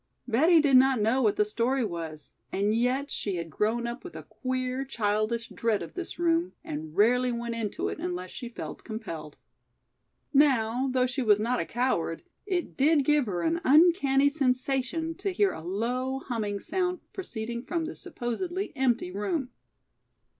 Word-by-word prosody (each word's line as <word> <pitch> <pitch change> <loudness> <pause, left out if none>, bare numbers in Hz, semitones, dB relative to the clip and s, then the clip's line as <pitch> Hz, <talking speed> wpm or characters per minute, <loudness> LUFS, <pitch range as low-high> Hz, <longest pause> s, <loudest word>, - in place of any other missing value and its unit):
Betty 320 +9 +5
did 280 -4 +5
not 265 -1 +5
know 225 +5 +2
what 215 -4 +3
the 210 - +3
story 240 +4 0
was 160 -6 -6 0.2
and 205 +2 +1
yet 255 +5 0
she 200 -3 -2
had 170 -2 -5
grown 225 +6 0
up 235 +1 -5
with 360 - -9
a - - -7
queer, 255 0 -3
childish 225 -2 -1
dread 225 -3 0
of - - -9
this 360 -1 -6
room 340 +1 +1
and 155 +1 -6
rarely 250 +4 +4
went 235 0 -3
into 225 -3 -2
it - - -4
unless 180 +1 -4
she 245 -3 -6
felt 235 - -7
compelled. 170 -10 -7 1.0
Now, 260 -3 +3
though 255 0 +3
she 255 +2 -2
was 210 -4 +4
not 240 +3 0
a - - -1
coward, 230 -9 -1 0.2
it 365 -3 -2
did 290 0 +3
give 295 -4 +3
her 180 -4 -2
an 335 +1 +1
uncanny 285 -2 +5
sensation 270 +3 0
to 390 +1 -2
hear 395 +2 +2
a - - -7
low, 245 +9 -2
humming 220 -6 -3
sound 360 - -1
proceeding 235 - -5
from 335 +1 -2
this 320 - -8
supposedly 350 - -4
empty 245 -8 +1
room. 250 - -2
250 Hz, 170 wpm, -28 LUFS, 215-285 Hz, 1.0 s, Betty